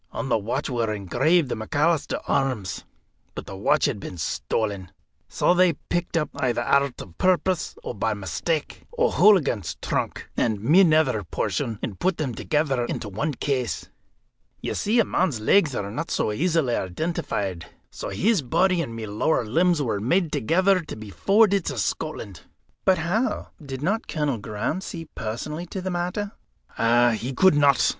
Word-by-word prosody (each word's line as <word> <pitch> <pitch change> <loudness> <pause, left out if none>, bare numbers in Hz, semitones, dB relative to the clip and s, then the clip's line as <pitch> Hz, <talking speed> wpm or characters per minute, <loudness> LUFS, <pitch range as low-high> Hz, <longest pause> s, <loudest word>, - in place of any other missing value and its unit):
On 135 - -4
the 120 - +3
watch 120 +7 -2
were 115 -4 -1
engraved 130 - +2
the - - -1
McAlister 145 +8 0
arms. 115 -9 -1 0.5
But - - -6
the 95 - -8
watch 125 +10 +2
had 135 -8 -1
been 90 - -7
stolen. 95 +4 -2 0.4
So - - +2
they 180 -1 +4
picked 175 +3 -3
up 150 -3 -1
either 120 -2 0
out 140 +3 +4 0.2
of 85 -3 -10
purpose, 185 -1 +1
or - - -4
by 110 0 -1
mistake 105 - -3 0.2
O'Hooligan's 200 - +3
trunk, - - -2
and 110 -3 +1
my 150 - +5
nether 155 - +3
portion, 110 +5 -2
and 100 - -4
put 185 -1 +1
them 135 -6 -2
together 140 0 0
into 110 - -4
one 140 +9 -2
case. 130 -3 -2 0.7
You - - -3
see, 225 +4 +1
a 225 - +4
man's 160 -11 0
legs 145 - +3
are 100 -2 -3
not 150 +9 -4
so - - 0
easily 155 0 +1
identified. 95 - -3 0.2
So - - -6
his 210 -3 +2
body 180 +7 +2
and 115 -8 -5
my 115 -1 -5
lower 110 +6 0
limbs 165 +6 +2
were 110 -5 -1
made 120 - +1
ready 165 - -6
together 180 - +2
to 165 - -7
be 110 -2 -9
forwarded 200 - +3
to 140 - -3
Scotland." 105 - -3 0.4
"But 190 -1 +5
how 195 +10 -1
did 135 -1 -6
not 210 +7 0
Colonel 145 -7 -1
Graham 105 - -3
see 165 -3 -6
personally 150 +10 -5
to 190 - -5
the 185 0 -3
matter?" 180 +4 -2 0.9
"He 130 +3 -4
could 190 +6 +6
not. 145 -2 +4
145 Hz, 165 wpm, -24 LUFS, 110-175 Hz, 0.9 s, could